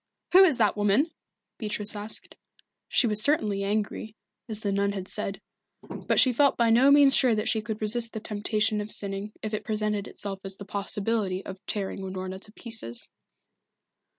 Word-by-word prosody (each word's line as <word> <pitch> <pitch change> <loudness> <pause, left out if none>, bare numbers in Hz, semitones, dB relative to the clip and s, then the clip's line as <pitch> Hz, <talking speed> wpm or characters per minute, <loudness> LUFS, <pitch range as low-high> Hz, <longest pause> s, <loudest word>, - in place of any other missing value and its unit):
"Who 380 +2 +8
is 320 -9 +4
that 215 -3 +2
woman?" 210 - +2 0.5
Beatrice 210 -1 -3
asked. 210 +1 -6 0.5
She - - +3
was 210 -2 +4
certainly 215 -8 +2
angry, 210 +1 -3 0.3
as 215 -1 -4
the 205 - -1
nun 200 0 0
had 190 -2 -6
said, 200 -1 -3 0.4
but - - -1
she 255 -2 +6
felt 280 +3 +3
by 235 -1 +3
no 250 +5 +5
means 280 -1 +6
sure 250 -4 +4
that 215 - -2
she 220 - +1
could 215 0 -5
resist 230 +2 +1
the 220 - -4
temptation 210 0 -1
of 210 +1 -5
sinning 200 +1 -2
if 215 0 -4
it 215 - -2
presented 210 -1 -2
itself 195 -1 -3
as 195 -1 -6
the 200 - -10
possibility 200 -1 -2
of 190 +1 -9
tearing 200 -2 -3
Unorna 190 0 -5
to 210 - -8
pieces. 220 - -5
210 Hz, 180 wpm, -27 LUFS, 200-225 Hz, 0.5 s, Who